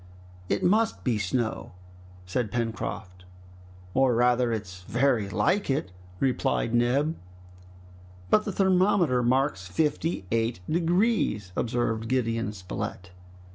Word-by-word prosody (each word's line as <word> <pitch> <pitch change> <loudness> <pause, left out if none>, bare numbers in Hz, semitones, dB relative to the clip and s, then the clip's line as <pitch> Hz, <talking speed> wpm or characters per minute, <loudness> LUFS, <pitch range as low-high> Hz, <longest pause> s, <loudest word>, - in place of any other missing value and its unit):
"It 100 - 0
must 220 +4 +2
be 120 -5 +1
snow!" 110 +2 -2 0.5
said 105 +4 -2
Pencroft. 110 -6 -4 0.7
"Or 130 -2 +3
rather 120 0 +3
it's 100 -5 -5
very 120 0 +1
like 125 - +1
it!" 135 -9 -1 0.3
replied 125 -3 0
Neb. 130 +7 +2 1.2
"But 215 - +5
the 205 - -2
thermometer 185 -8 +3
marks 125 -6 +1
fifty 150 - -1
eight 115 -2 0
degrees!" 170 - +1
observed 115 -1 -1
Gideon 115 -3 0
Spilett. 90 -1 -6
120 Hz, 105 wpm, -27 LUFS, 105-145 Hz, 1.2 s, But